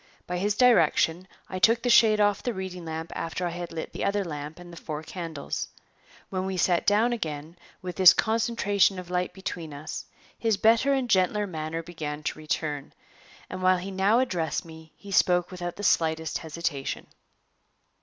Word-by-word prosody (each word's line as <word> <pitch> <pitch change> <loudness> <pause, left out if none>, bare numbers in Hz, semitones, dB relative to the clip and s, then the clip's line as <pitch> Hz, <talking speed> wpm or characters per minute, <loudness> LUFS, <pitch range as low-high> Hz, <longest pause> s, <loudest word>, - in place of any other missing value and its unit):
By 180 0 -3
his 205 +2 0
direction, 185 -8 +4 0.2
I 185 - -5
took 230 +4 +4
the 245 - +1
shade 220 -2 +6
off 205 -1 +3
the 245 -3 -3
reading 185 -2 -6
lamp 160 +1 -5
after 165 +2 -3
I 175 - -1
had 175 0 -6
lit 165 -1 -5
the - - -4
other 200 0 0
lamp 150 -1 -6
and 175 -1 -12
the 170 - -10
four 155 -1 -5
candles. 165 -4 -5 0.6
When 185 0 -2
we 190 -1 -3
sat 175 -1 +2
down 220 +4 +4
again, 155 -6 -5 0.3
with 180 -1 -6
this 185 -2 +10
concentration 220 -4 +2
of 180 -1 -8
light 180 0 0
between 170 -5 -6
us, 150 +2 -6 0.3
his 225 -3 0
better 230 +6 +4
and 265 -2 +1
gentler 205 0 +2
manner 165 -2 -4
began 155 -3 -6
to 155 - -3
return, 150 -2 -3 0.5
and 185 - -6
while 185 0 +4
he 185 +2 -6
now 195 +4 +3
addressed 180 -13 -1
me 160 -1 -13
he 200 - -11
spoke 180 -1 +3
without 175 -1 -5
the 205 - -8
slightest 160 -3 +1
hesitation. 160 -3 -4
180 Hz, 180 wpm, -27 LUFS, 160-205 Hz, 0.6 s, this